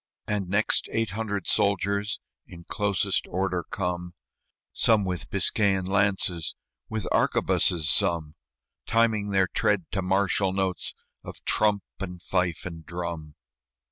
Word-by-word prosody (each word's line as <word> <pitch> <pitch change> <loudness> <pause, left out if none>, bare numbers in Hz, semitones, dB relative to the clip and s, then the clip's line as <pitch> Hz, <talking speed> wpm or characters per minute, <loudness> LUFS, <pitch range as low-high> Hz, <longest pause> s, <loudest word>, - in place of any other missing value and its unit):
And 100 -3 -2
next 100 +3 +2
eight 115 -3 0
hundred 105 -2 -3
soldiers 100 +1 +1 0.3
In 85 -1 -11
closest 100 +1 0
order 90 -1 -1
come, 90 -1 -4 0.6
Some 110 -3 +3
with 90 -6 -3
Biscayan 95 -3 +2
lances, 95 -4 +1 0.3
With 110 -3 -3
arquebuses 80 -4 +2
some, 85 -2 +2 0.5
Timing 110 -3 +2
their 95 -1 +3
tread 95 0 +1
to 95 - -1
martial 95 0 +1
notes 95 -2 -2 0.3
Of - - -10
trump 105 -2 +2 0.2
and 90 -2 -5
fife 90 -2 -1
and 85 -2 -7
drum. 85 -3 -5
95 Hz, 120 wpm, -26 LUFS, 90-100 Hz, 0.6 s, Some